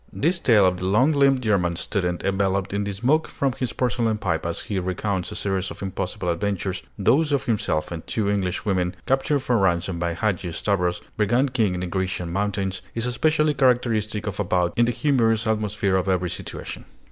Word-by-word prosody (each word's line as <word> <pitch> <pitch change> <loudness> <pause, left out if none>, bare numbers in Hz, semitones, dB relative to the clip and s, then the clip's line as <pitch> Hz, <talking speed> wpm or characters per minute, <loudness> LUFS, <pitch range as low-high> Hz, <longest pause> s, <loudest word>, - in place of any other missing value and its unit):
This 170 +4 0
tale 110 - +5
of 90 -1 +2
the 90 - -3
long 120 +10 +4
limbed 135 -3 +3
German 90 -6 +1
student, 90 -1 -2
enveloped 95 -1 0
in 100 0 -1
the 100 - -2
smoke 130 +11 +1
from 135 -1 -1
his 125 -3 -1
porcelain 115 -3 0
pipe 85 -5 -1
as 85 - -3
he 100 -3 -3
recounts 95 +1 -2
a - - -6
series 95 -1 -1
of - - -8
impossible 95 0 -4
adventures, 95 +1 -1 0.2
those 140 +10 +3
of 140 -2 +1
himself 100 -9 -1
and 85 -2 -6
two 110 -3 -1
Englishwomen, 95 -2 0
captured 135 +2 +1
for 120 -3 +1
ransom 90 -1 +1
by 85 -1 -1
Hadgi 95 -3 -1
Stavros, 90 -1 0 0.2
brigand 120 +5 +2
king 110 -7 +2
in 90 - -3
the - - -2
Grecian 90 -1 -2
mountains, 100 -1 -1
is 115 0 -1
especially 150 +4 +2
characteristic 120 -6 +1
of 105 -1 -4
About 90 -3 +1
in 120 - +4
the 120 - +1
humorous 115 -5 +2
atmosphere 105 -3 0
of 95 +1 -1
every 90 -2 0
situation. - - -7
100 Hz, 190 wpm, -24 LUFS, 90-120 Hz, 0.2 s, tale